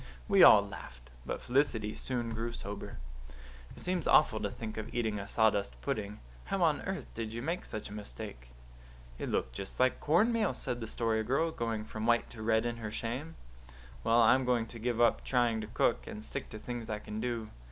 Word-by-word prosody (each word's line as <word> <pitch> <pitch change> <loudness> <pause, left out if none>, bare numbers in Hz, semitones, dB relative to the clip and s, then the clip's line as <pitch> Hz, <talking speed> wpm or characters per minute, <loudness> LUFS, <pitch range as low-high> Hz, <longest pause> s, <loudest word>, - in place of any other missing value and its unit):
We - - +5
all - - +9
laughed. - - -10 0.2
But - - -3
Felicity 120 -5 +1
soon 120 -3 -3
grew 115 +1 -3
sober. 100 -2 -6 0.8
"It - - -8
seems 180 -3 -1
awful 110 -8 +5
to 105 - -1
think 110 +1 -6
of 110 +1 -5
eating 110 -3 0
a 100 - -6
sawdust 105 -2 +2
pudding. 105 -6 -3 0.3
How - - 0
on - - +3
earth - - -4
did 110 -1 -4
you 120 +1 -5
make 170 +4 -2
such 110 - -6
a 105 - -9
mistake?" - - -7 0.7
"It - - -3
looked - - -1
just 100 -1 -7
like 130 0 +3
cornmeal," 215 +7 +3
said 125 -3 -2
the 115 - -5
Story 110 -1 0
Girl, 140 +8 +1
going 115 -5 -2
from 110 +1 -4
white 120 0 +3
to 115 - -9
red 110 +1 +2
in 120 0 -2
her 110 -2 -5
shame. 125 +9 -4 0.7
"Well, 115 +1 +5
I'm 130 +4 +5
going 125 -2 +2
to 115 - -8
give 120 0 -1
up 120 -1 +4
trying 120 -3 +2
to 110 - -6
cook, - - +1
and 105 +1 -7
stick - - -5
to 110 - -7
things 120 +1 -6
I 110 - -1
can 105 +1 -6
do. 115 -2 -3
115 Hz, 205 wpm, -32 LUFS, 110-125 Hz, 0.8 s, all